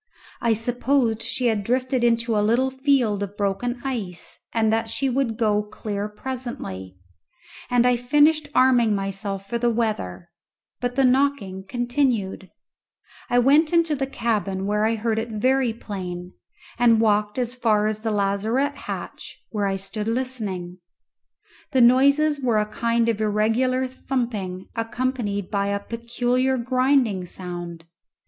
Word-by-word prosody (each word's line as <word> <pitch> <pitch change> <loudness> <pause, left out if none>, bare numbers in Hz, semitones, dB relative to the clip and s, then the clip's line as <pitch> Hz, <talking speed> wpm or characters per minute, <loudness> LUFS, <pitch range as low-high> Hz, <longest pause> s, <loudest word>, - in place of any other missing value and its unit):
I 230 -1 +3
supposed 240 0 0
she 235 +3 0
had 220 -4 +1
drifted 255 +2 0
into 230 -1 +2
a 210 - +3
little 240 +5 +2
field 260 -6 +1
of 200 0 -5
broken 215 +5 -1
ice, 210 -10 -5
and 220 -1 +2
that 225 0 0
she 270 +4 0
would 250 -3 0
go 210 -2 +2
clear 210 0 -5
presently, 210 - -6 0.7
and 245 -1 +3
I 250 -1 +4
finished 295 +4 +3
arming 245 -4 +4
myself 195 0 -4
for 235 +3 -2
the 240 0 +2
weather; 215 - -2 0.5
but 245 0 -2
the 270 - +3
knocking 250 -8 +1
continuing, 240 -6 -1 0.8
I 245 - +2
went 290 +6 +4
into 335 -3 +3
the 270 -1 -2
cabin 205 -7 -1
where 210 +1 +1
I 225 - +1
heard 220 0 -1
it 230 +1 -4
very 255 +3 +1
plain, 185 -5 -6 0.5
and 230 -2 +5
walked 210 -1 +2
as 245 -1 -1
far 220 -4 +2
as 215 0 -1
the 225 +1 -2
lazarette 215 +7 0
hatch, - - -6
where 205 -2 0
I 195 - 0
stood 195 +2 -5
listening. 215 -8 -3 0.9
The 260 - +4
noises 280 +5 +5
were 240 -4 +2
a 210 - +2
kind 230 +2 0
of 220 -2 0
irregular 225 +5 +1
thumping 235 -8 -3
accompanied 230 -4 -2
by 200 -1 0
a 200 0 0
peculiar 245 +4 -1
grinding 255 -6 +1
sound. 175 -2 -7
230 Hz, 145 wpm, -23 LUFS, 205-255 Hz, 0.9 s, and